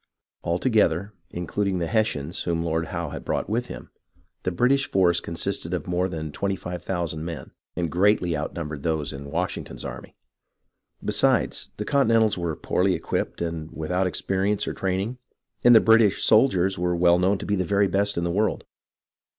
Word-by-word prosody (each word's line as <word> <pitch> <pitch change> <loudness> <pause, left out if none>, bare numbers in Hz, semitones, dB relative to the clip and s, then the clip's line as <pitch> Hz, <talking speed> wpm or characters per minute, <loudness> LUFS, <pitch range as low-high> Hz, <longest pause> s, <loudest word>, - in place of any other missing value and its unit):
All 85 +1 0
together, 105 -4 +1 0.2
including 95 +2 -2
the 85 - -1
Hessians 85 -7 -1
whom 85 -1 -1
Lord 80 0 -1
Howe 85 -2 -4
had - - -7
brought - - -2
with 120 +4 -1
him, - - -9 0.5
the - - -1
British 125 +9 +2
forces 90 -3 +3
consisted 85 +1 -2
of 85 - -5
more 90 +1 0
than 80 -3 -5
twenty 100 +6 -1
five 90 -1 -6
thousand 85 -4 -3
men, 85 -1 -6 0.2
and 85 -3 -2
greatly 90 -2 +2
outnumbered 75 -1 -4
those 80 -2 -1
in 70 +1 -8
Washington's - - -4
army. - - -8 0.9
Besides, - - +1
the 105 - -4
Continentals 115 -6 +3
were 85 -3 -2
poorly 95 +4 +1
equipped - - -3
and 80 -2 -4
without 90 +5 -1
experience 95 +3 -1
or - - -2
training, 95 +6 -2 0.4
and 120 -1 +8
the - - +10
British 110 -3 +4
soldiers 95 -6 +3
were 90 0 0
well 85 0 +4
known 95 +3 +2
to - - -7
be 105 - 0
the 95 - 0
very 100 +3 +2
best 100 +1 0
in 85 - 0
the 85 - 0
world. 105 +4 0
90 Hz, 175 wpm, -25 LUFS, 85-100 Hz, 0.9 s, the